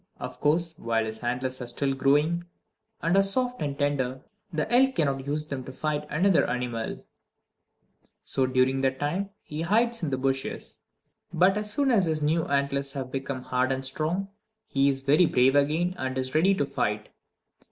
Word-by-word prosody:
Of - - -7
course, 165 +2 +1
while 115 -1 0
his 110 0 -6
antlers 125 +2 -2
are 125 - -5
still 135 +3 0
growing, 150 +6 +2 0.6
and 170 +2 +2
are 195 - +6
soft 245 +3 0
and 140 -2 -2
tender, 135 -3 -1 0.3
the 155 -3 -1
elk 265 +2 +5
cannot 140 -3 0
use 150 +1 -1
them 140 -3 -5
to 130 - -7
fight 150 +1 -2
another 180 +4 +3
animal; 120 -2 -3 1.2
so 130 -1 0
during 130 +1 +2
that 130 0 0
time 180 +7 -1
he 150 +1 -5
hides 230 +6 +2
in 165 - -1
the 130 - -1
bushes. 135 0 -3 0.5
But 180 +3 +4
as 210 0 -2
soon 275 +4 +1
as 205 -6 +4
his 160 -2 0
new 160 +2 +1
antlers 140 0 0
have 130 -3 -5
become 135 -1 -4
hard 125 +1 0
and 135 0 -1
strong, 160 +8 -1 0.4
he 140 0 +2
is 135 -1 -2
very 150 +5 +5
brave 130 0 +4
again, 155 +5 +2
and 130 0 -2
is 130 0 -2
ready 185 +6 +4
to - - 0
fight! - - -2
145 Hz, 180 wpm, -27 LUFS, 130-170 Hz, 1.2 s, are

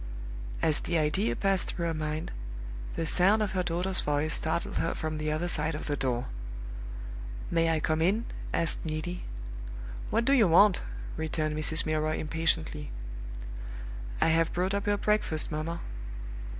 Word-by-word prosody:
As 155 -1 +4
the 170 - 0
idea 150 -7 +2
passed 195 +3 +2
through 170 - -2
her 165 - +1
mind, 155 0 -2 0.6
the 165 - -1
sound 195 +7 +4
of 205 - -1
her 185 - +1
daughter's 180 +2 0
voice 150 +1 +1
startled 160 +2 0
her 165 - 0
from 155 -1 -2
the 155 0 0
other 155 +3 0
side 160 -2 +1
of 150 - -5
the 145 - 0
door. 130 -2 0 1.3
"May 165 -1 +3
I 160 -1 +2
come 155 +1 +1
in?" 205 +8 +3 0.3
asked 165 - +1
Neelie. 160 +3 -3 0.8
"What 230 +2 +2
do 275 - +5
you 235 -7 +6
want?" 185 +4 +6 0.4
returned 155 -1 -1
Mrs. 155 +1 +6
Milroy, 155 0 +1
impatiently. 160 -1 0 1.3
"I - - +4
have 165 0 +3
brought 185 +2 +1
up 200 0 -1
your 205 0 +3
breakfast, 205 -7 +2
mamma." 160 +3 -2
160 Hz, 155 wpm, -30 LUFS, 155-180 Hz, 1.3 s, you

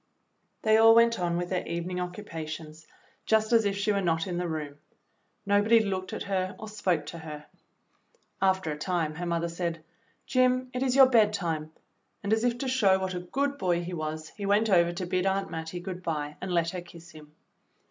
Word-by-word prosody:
They 220 0 +5
all 225 0 +7
went 230 -1 +4
on 170 -1 0
with 175 0 -3
their 185 - 0
evening 175 +2 -3
occupations 160 -4 -7 0.4
just 220 +1 +2
as 225 -2 +5
if 200 0 0
she 200 +1 +1
were 200 -1 +1
not 165 -3 0
in 175 -2 -3
the 180 - -2
room. 150 -3 -5 0.7
Nobody 205 +3 +4
looked 190 -3 -2
at - - -4
her 185 -1 -2
or 220 - -8
spoke 180 -7 -1
to 165 +3 -8
her. 150 -2 -8 1.0
After 190 -4 +2
a 150 - -4
time 165 -2 -1
her 175 +3 -5
mother 170 0 0
said, 170 -1 -4 0.4
"Jim, 255 0 +2
it 250 - -3
is 260 -1 +1
your 270 -1 +9
bed 225 -5 +4
time," 160 -5 -3 0.5
and 200 +2 +1
as 220 +1 +1
if 245 -1 +1
to 265 - -3
show 215 -8 +3
what 190 -1 -3
a 180 - -3
good 280 +10 -2
boy 175 -4 +1
he 180 +1 -6
was 155 -1 -4
he 205 - -10
went 210 +2 +3
over 170 -2 +4
to 175 +1 -4
bid 185 +1 0
Aunt 195 0 -1
Mattie 160 +2 -5
good 180 0 -6
bye 150 -3 -3
and 185 - -4
let 170 -1 +1
her 180 - -5
kiss 170 -1 -14
him. 150 -1 -15
180 Hz, 210 wpm, -28 LUFS, 165-210 Hz, 1.0 s, your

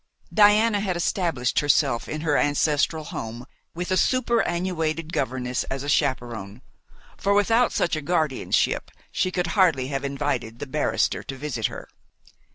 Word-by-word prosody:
Diana 210 +1 +5
had 190 -3 -1
established 165 -8 0
herself 140 -4 +1
in 155 - -4
her 155 -2 +1
ancestral 150 +2 +1
home 120 -3 -6 0.3
with 180 +2 -4
a 185 - +3
superannuated 175 -10 0
governess 125 -2 -1
as 135 0 -4
a 145 - -4
chaperon, 120 -7 -1 0.5
for 200 +1 +1
without 225 +4 +3
such 170 - 0
a 155 - -3
guardianship 155 -3 0 0.2
she 185 - 0
could 180 -1 -1
hardly 160 -10 +3
have 135 -1 -3
invited 135 -5 -2
the 145 - -5
barrister 150 +2 0
to 135 - -7
visit 130 -5 -2
her. - - -9
150 Hz, 145 wpm, -24 LUFS, 130-180 Hz, 0.5 s, Diana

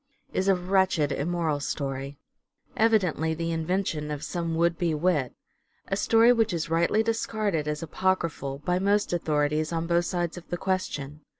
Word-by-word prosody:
is 190 - 0
a 195 - +5
wretched 180 -4 +1
immoral 160 -1 -1
story; 140 -1 -4 0.6
evidently 185 -8 +2
the 165 +1 -2
invention 165 -2 -1
of 150 -1 -4
some 170 0 -2
would 170 0 +2
be 165 -2 0
wit: 150 -6 0 0.5
a 195 - +1
story 225 +4 +5
which 225 -5 +1
is 165 -1 -3
rightly 170 +6 +3
dis 225 0 0
carded, 200 -9 -1
as 150 +2 -2
apocryphal, 165 -5 -1
by 180 0 +1
most 200 0 +1
authorities 155 -1 0
on 165 0 -1
both 170 0 +2
sides 175 -1 -2
of 175 - -20
the 175 - -2
question. 155 -6 -3
170 Hz, 165 wpm, -27 LUFS, 150-185 Hz, 0.6 s, a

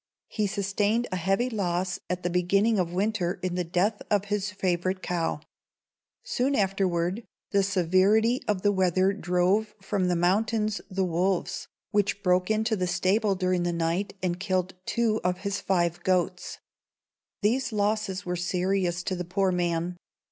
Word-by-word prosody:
He 210 -2 0
sustained 205 +4 0
a - - -1
heavy 195 +7 +1
loss 185 -4 -1
at 180 0 -2
the 175 - 0
beginning 195 +5 +2
of 175 -2 0
winter 190 -1 -1
in 185 -1 -1
the 180 0 0
death 180 +5 0
of 205 -1 +2
his 205 -1 0
favorite 185 -2 -1
cow. 165 -4 -1 0.8
Soon 280 - 0
afterward 190 -1 0 0.3
the 200 - +4
severity 195 +5 +3
of 200 -3 0
the 205 - +4
weather 190 0 +2
drove 195 +3 +1
from 195 -1 -1
the 180 - +2
mountains 210 +4 +1
the 190 -1 0
wolves, 180 +2 -1 0.2
which 205 -1 0
broke 180 0 +2
into 220 +1 +1
the 185 -3 -1
stable 195 +3 +1
during 185 -1 0
the 175 0 0
night 170 +5 -1
and 175 -1 -1
killed 185 -2 -1
two 225 -2 +1
of 180 0 -1
his 200 0 -2
five 175 -2 0
goats. 180 0 0 0.9
These 245 +4 +1
losses 205 -2 -1
were 180 0 -2
serious 180 0 0
to 185 - -2
the 180 - -3
poor 185 +2 0
man. 175 0 -1
190 Hz, 155 wpm, -27 LUFS, 180-205 Hz, 0.9 s, the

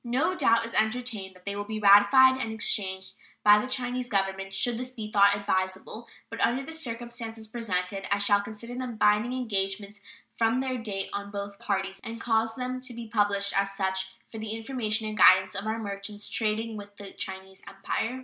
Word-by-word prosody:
No 260 +9 +1
doubt 230 -9 +3
is 230 - -8
entertained 220 -4 -1
that 180 - -19
they 200 0 -3
will 205 - -3
be 215 +1 -4
ratified 215 +6 +7
and 225 - -3
exchanged 190 -4 -1 0.3
by 210 0 +8
the 255 - -3
Chinese 250 -1 -2
Government 195 -1 -1
should 240 +4 +1
this 250 +1 -4
be 220 -4 -7
thought 200 -1 +5
advisable; 190 +3 -2 0.2
but 230 - -5
under 250 +3 +2
the 320 - -8
circumstances 235 -5 -5
presented 195 -4 -3
I 200 - +4
shall 205 0 +3
consider 220 +3 -8
them 250 -1 -4
binding 210 +3 +3
engagements 200 -4 -1 0.4
from 230 +2 +3
their 260 -1 -2
date 200 -4 -3
on 200 0 -4
both 200 0 -6
parties, 195 -1 -2
and 230 +1 -6
cause 225 -1 +1
them 255 +1 -4
to 255 -2 -5
be 230 -1 -7
published 205 -2 +1
as 195 0 +1
such 190 -1 -2 0.2
for 225 - -7
the 220 0 -4
information 225 -2 -2
and 215 - -4
guidance 185 -1 +6
of 200 +2 -4
our 220 +1 -1
merchants 205 -1 -6
trading 220 0 -1
with 205 0 -11
the 200 -2 -9
Chinese 190 0 -7
Empire. 225 +5 -3
215 Hz, 190 wpm, -28 LUFS, 200-235 Hz, 0.4 s, by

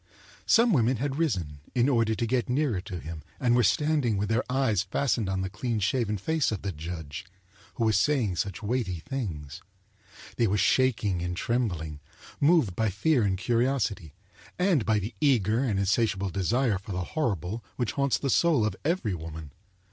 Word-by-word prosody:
Some 230 -1 +5
women 125 -3 +3
had 140 +4 -2
risen, 90 - -1 0.2
in 120 +1 +3
order 115 -5 +2
to 115 - -1
get 125 +1 0
nearer 125 -7 +1
to 90 -2 -6
him, 80 0 -7 0.2
and 120 -2 +3
were 125 - +4
standing 140 - +2
with 105 +1 -1
their 115 - +1
eyes 130 -7 +2
fastened 105 +1 0
on 95 0 -1
the 95 - -1
clean 115 +2 -2
shaven 105 +1 0
face 160 - 0
of 105 - -4
the 100 - -2
judge, 80 -1 -6 0.5
who 120 - -1
was 110 -3 +3
saying 115 -8 +1
such 100 +3 -3
weighty 105 -7 -1
things. 85 - -5 0.8
They, 115 - +3
were 105 +1 +1
shaking 105 -7 +2
and 90 0 -3
trembling, 90 -12 -2 0.4
moved 145 - +3
by 110 +1 +1
fear 130 - +2
and 95 -3 +1
curiosity, 115 - 0 0.4
and 180 - +2
by 110 -1 +3
the 105 +3 -3
eager 115 -6 +3
and 110 -7 0
insatiable 100 -1 +1
desire 105 +3 +1
for 100 0 -8
the 90 0 -2
horrible, 110 - -2
which 120 -3 -1
haunts 140 -2 +1
the 135 - -1
soul 155 -9 +3
of 110 - -1
every 155 - 0
woman. 80 -3 -7
110 Hz, 180 wpm, -27 LUFS, 95-130 Hz, 0.8 s, Some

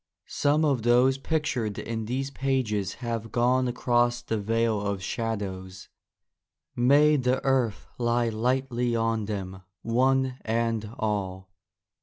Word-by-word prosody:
Some 150 +2 +1
of 140 -5 +1
those 125 +3 +4
pictured 140 - -1
in 110 -1 -4
these 135 +4 -2
pages 120 -8 -1
have 115 -1 -3
gone 125 +2 +2
across 120 0 +1
the 110 -2 -2
Vale 115 0 0
of 100 -2 -3
Shadows: 95 -4 -4 0.9
may 145 +5 +5
the 125 0 +1
earth 130 -5 +1
lie 120 0 +1
lightly 120 +1 0
on 115 -1 0
them, 95 -3 -5 0.2
one 130 +2 +1
and 115 -1 -1
all. 95 -3 -3
120 Hz, 120 wpm, -27 LUFS, 110-130 Hz, 0.9 s, may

